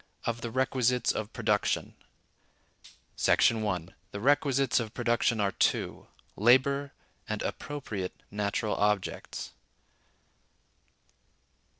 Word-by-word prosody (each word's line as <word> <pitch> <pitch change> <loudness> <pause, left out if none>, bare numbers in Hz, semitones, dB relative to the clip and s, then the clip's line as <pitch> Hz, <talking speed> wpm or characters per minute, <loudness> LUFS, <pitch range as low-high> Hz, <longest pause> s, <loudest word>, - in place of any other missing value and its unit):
Of 115 0 -2
The 115 - -3
Requisites 125 0 +1
Of 110 0 -4
Production. - - 0 1.2
§ 115 -1 +4
1. 90 -5 -2 0.2
The 100 - -6
Requisites 135 +1 +3
of 110 -2 -5
Production 120 -1 +1
are 100 -1 +2
Two: - - 0 0.3
Labor, 135 +5 +3 0.4
and - - -2
Appropriate 110 -11 -4 0.2
Natural 105 +1 -1
Objects. 105 -2 -1
115 Hz, 90 wpm, -29 LUFS, 105-130 Hz, 1.2 s, §